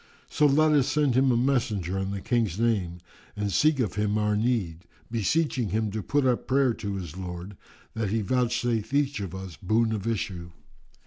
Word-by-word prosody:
So 150 - +4
let 155 +2 +4
us 145 -4 +3
send 150 -4 +2
him 130 +1 +3
a 120 - +2
messenger 115 -8 0
in 95 0 -2
the 100 -1 -4
King's 110 -6 0
name 95 -7 0 0.3
and 105 -1 -2
seek 155 - +3
of 110 -7 0
him 105 0 0
our 105 0 +1
need, 105 -7 -1 0.3
beseeching 120 - 0
him 110 -1 -1
to 110 +1 -3
put 145 +5 0
up 125 -2 +1
prayer 135 -2 +3
to 100 -3 -5
his 90 -4 -6
Lord, 90 +1 -7 0.4
that 110 -2 -2
He 110 +2 0
vouchsafe 120 0 0
each 145 -2 +1
of 95 -3 -5
us 95 -4 -8
boon 110 +4 +1
of 105 0 -3
issue. 90 -6 -3
110 Hz, 190 wpm, -26 LUFS, 95-125 Hz, 0.4 s, So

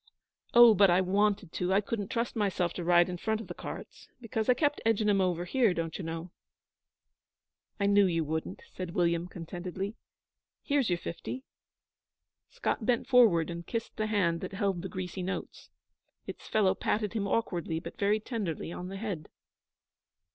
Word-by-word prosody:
Oh, 240 -1 +10
but 200 -1 +5
I 175 +1 +5
wanted 195 -1 +1
to! 180 +1 -1
I 195 - +5
couldn't 205 -1 -3
trust 235 -1 -2
myself 190 -5 0
to 175 - -5
ride 175 0 +5
in 180 -1 -4
front 220 +4 -1
of 225 - -7
the - - -7
carts, - - -9
because 225 -1 -3
I 250 - +6
kept 290 +2 +1
edging 220 -1 +2
'em 200 -2 +3
over 175 -2 0
here, 220 -1 +2
don't 165 -1 -3
you 190 - -5
know?' 165 +1 -5 1.5
'I 200 - +1
knew 200 0 +5
you 165 -2 0
wouldn't,' 160 +1 -4
said 180 -2 -6
William, 170 -1 +1
contentedly, 180 +3 -5 0.7
'Here's 280 -6 +1
your 175 - +2
fifty.' 215 +10 -6 1.1
Scott - - -2
bent 240 +1 +1
forward 215 - +5
and 170 0 -7
kissed 230 -1 -4
the 215 - 0
hand 180 -6 +1
that - - -6
held 195 -3 -1
the 190 - -5
greasy 185 -1 -5
notes. 190 +2 -5 0.6
Its - - -8
fellow 205 -3 +3
patted 210 0 -1
him 205 -3 -1
awkwardly 175 -7 -1
but - - -10
very 205 +2 +2
tenderly 205 - -4
on 180 +1 -6
the 195 +1 -6
head. 195 -7 -5
195 Hz, 175 wpm, -30 LUFS, 175-215 Hz, 1.5 s, Oh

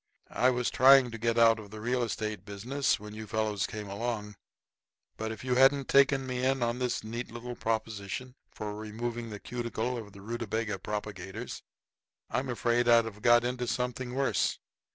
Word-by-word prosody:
I 125 - +4
was 125 -1 0
trying 130 -1 +7
to 115 - -7
get 115 +1 +1
out 115 -1 +6
of 105 -2 -10
the 110 +1 -9
real 125 +3 0
estate 110 -3 -3
business 115 +8 -1
when 105 0 -9
you 110 0 -7
fellows 105 -2 0
came 105 -1 -6
along. 105 0 -3 0.8
But 110 0 -3
if 110 +1 -7
you 130 -1 0
hadn't 135 +2 +4
taken 135 -1 +5
me 125 -1 -3
in 135 -1 +2
on 120 +1 -1
this 125 -1 -1
neat 115 +3 -5
little 120 +1 -6
proposition 110 +2 -3 0.2
for 105 -1 -5
removing 115 +2 -4
the 105 -1 -7
cuticle 120 +1 -3
of 105 -3 -10
the 100 - -12
rutabaga 110 -1 -3
propagators 105 +2 -5 0.7
I'm 130 +3 -1
afraid 120 0 +1
I'd 115 -1 +6
have 105 -2 -8
got 120 0 +6
into 125 0 -2
something 125 +1 -2
worse. 135 0 +1
115 Hz, 175 wpm, -30 LUFS, 110-125 Hz, 0.8 s, trying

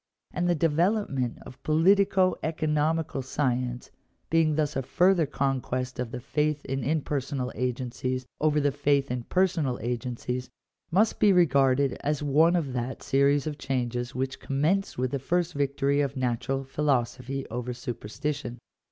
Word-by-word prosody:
And 175 0 0
the 175 - +3
development 165 - +1
of 125 - -13
politico 185 +3 +4
economical 155 -1 0
science, 125 -2 -2 0.4
being 160 -2 +3
thus 150 -1 0
a 135 - 0
further 175 +4 +3
conquest 130 -2 -2
of 125 -2 -2
the 125 +1 -5
faith 150 +3 -1
in 135 0 -2
impersonal 140 -2 -1
agencies 125 0 -2
over 150 -1 +2
the 145 -1 +2
faith 140 -1 +1
in 125 -1 -3
personal 170 -9 +1
agen 120 +1 -3
cies, 125 +2 -4 0.4
must 205 +6 +2
be 210 -2 +6
regarded 140 -6 +3
as 150 0 -1
one 155 +5 +4
of 150 -7 -1
that 125 +1 -4
series 140 +1 +3
of 150 -2 -4
changes 125 -2 -2
which 130 +1 -2
commenced 160 +9 0
with 125 0 -1
the 140 - -1
first 175 +5 0
victory 140 0 +1
of 140 -1 -2
natural 130 +2 -1
philosophy 135 -1 -1
over 125 +1 -3
superstition. 120 +2 -4
140 Hz, 145 wpm, -27 LUFS, 125-155 Hz, 0.4 s, be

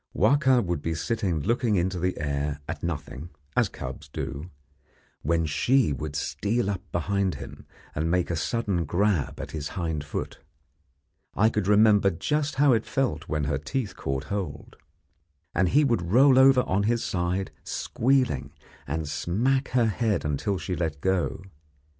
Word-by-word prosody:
Wahka 130 -5 +4
would 85 -4 -2
be 80 +1 -2
sitting 90 -2 -1
looking 115 - +1
into 90 0 0
the 90 +1 -1
air 70 0 -2
at - - -5
nothing, 80 -1 -5 0.3
as - - +3
cubs 65 +4 -7
do, 75 +3 -5 0.7
when 80 +1 +1
she 110 - +2
would 75 +2 -5
steal 105 +8 -1
up 95 - -4
behind 95 +2 0
him - - -10 0.3
and 80 +2 -1
make 90 0 +1
a - - 0
sudden 95 +1 -1
grab 90 -1 0
at - - -6
his 75 -2 -4
hind 80 -4 -2
foot. 75 - -5 1.0
I 110 +2 +4
could 105 -4 -1
remember 105 -1 +5
just 150 - -1
how 140 -1 +5
it 115 -1 +2
felt 80 - -1
when 75 -1 -1
her 70 -1 -1
teeth 95 - -3
caught 70 0 -3
hold. 80 -5 -5 0.8
And 90 +1 +2
he 150 +8 +4
would 120 -9 +2
roll 130 +3 +6
over 135 -1 +7
on 95 -4 0
his 120 -1 +1
side, 90 +2 -1
squealing, 115 - 0 0.3
and 80 +2 -2
smack 125 - 0
her 125 -2 +2
head 110 -3 0
until 75 +7 -1
she 90 +2 -3
let 80 -4 -2
go. 95 -1 0
90 Hz, 160 wpm, -26 LUFS, 75-115 Hz, 1.0 s, over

